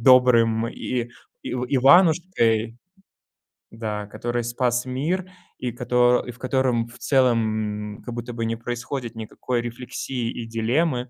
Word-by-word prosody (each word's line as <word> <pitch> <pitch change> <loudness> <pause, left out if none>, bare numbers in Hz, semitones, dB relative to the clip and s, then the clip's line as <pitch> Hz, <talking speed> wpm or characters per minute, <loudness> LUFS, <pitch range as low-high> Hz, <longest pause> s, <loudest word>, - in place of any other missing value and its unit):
добрым 115 -2 +5
и 120 -1 -3 0.3
и - - -5
Иванушкой 130 - +3 0.9
Да, 105 -2 -4
который 120 +3 -3
спас 120 +1 0
мир, 160 +9 -2 0.3
и 125 -1 -3
кото 125 0 +3
и 125 - -5
в 120 - -16
котором, 130 -3 +1
в 120 - -15
целом, 110 -5 +1
м, - - -16
как 120 - -6
будто 120 +1 -5
бы 115 -1 -2
не 115 0 -1
происходит 120 +1 -5
никакой 115 +2 -3
рефлексии 120 0 -4
и 120 - -6
дилеммы, 125 +4 0
120 Hz, 135 wpm, -24 LUFS, 115-130 Hz, 0.9 s, добрым